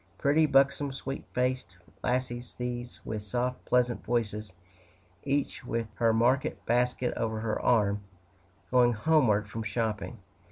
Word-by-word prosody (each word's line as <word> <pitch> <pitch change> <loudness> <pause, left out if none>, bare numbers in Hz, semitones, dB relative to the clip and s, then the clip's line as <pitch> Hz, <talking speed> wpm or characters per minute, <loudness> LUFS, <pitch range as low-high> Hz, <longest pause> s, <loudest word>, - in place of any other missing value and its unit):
Pretty, 155 +3 +3
buxom, 140 0 +3
sweet 135 0 -5
faced 125 -7 -1 0.3
lassies, 125 -1 -2
these, 120 0 -5
with 110 -1 -3
soft, 125 +4 -2
pleasant 125 -1 +2
voices, 105 -3 -1 0.7
each 140 -1 -1
with 115 -2 -2
her 115 0 +3
market 120 +4 +1
basket 125 +1 +1
over 110 -1 -2
her 110 -1 -1
arm, 105 -4 +2 0.7
going 125 -1 +5
homeward 110 -5 +3
from 110 +2 -5
shopping. 110 +1 -2
120 Hz, 125 wpm, -29 LUFS, 110-125 Hz, 0.7 s, going